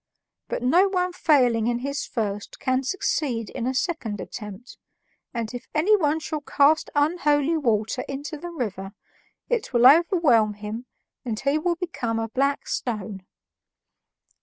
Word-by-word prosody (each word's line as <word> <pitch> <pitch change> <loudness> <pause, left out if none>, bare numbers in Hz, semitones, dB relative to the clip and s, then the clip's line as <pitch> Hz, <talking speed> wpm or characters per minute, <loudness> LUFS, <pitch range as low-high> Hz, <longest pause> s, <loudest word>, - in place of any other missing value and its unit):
But - - -3
no 345 +10 +5
one 365 -2 -1
failing 250 -10 +3
in 240 0 +1
his 280 +3 -3
first 205 -4 -4
can 260 0 +1
succeed 260 - -1
in 245 -1 -3
a 260 - 0
second 250 - -2
attempt, 210 +3 -9 0.5
and 235 -1 -4
if 245 - -7
anyone 320 -3 +3
shall 310 -1 -4
cast 295 +2 +3
unholy 295 0 +2
water 230 -5 0
into 285 +3 -5
the 345 +4 -7
river, 200 - -5 0.5
it 470 - -2
will 240 0 +4
overwhelm 285 - +5
him 215 +4 -6 0.4
and 225 -4 -3
he 280 +3 +1
will 345 +2 0
become 280 -10 -3
a 225 0 -2
black 275 +4 0
stone." 205 -5 -4
265 Hz, 140 wpm, -24 LUFS, 225-315 Hz, 0.5 s, no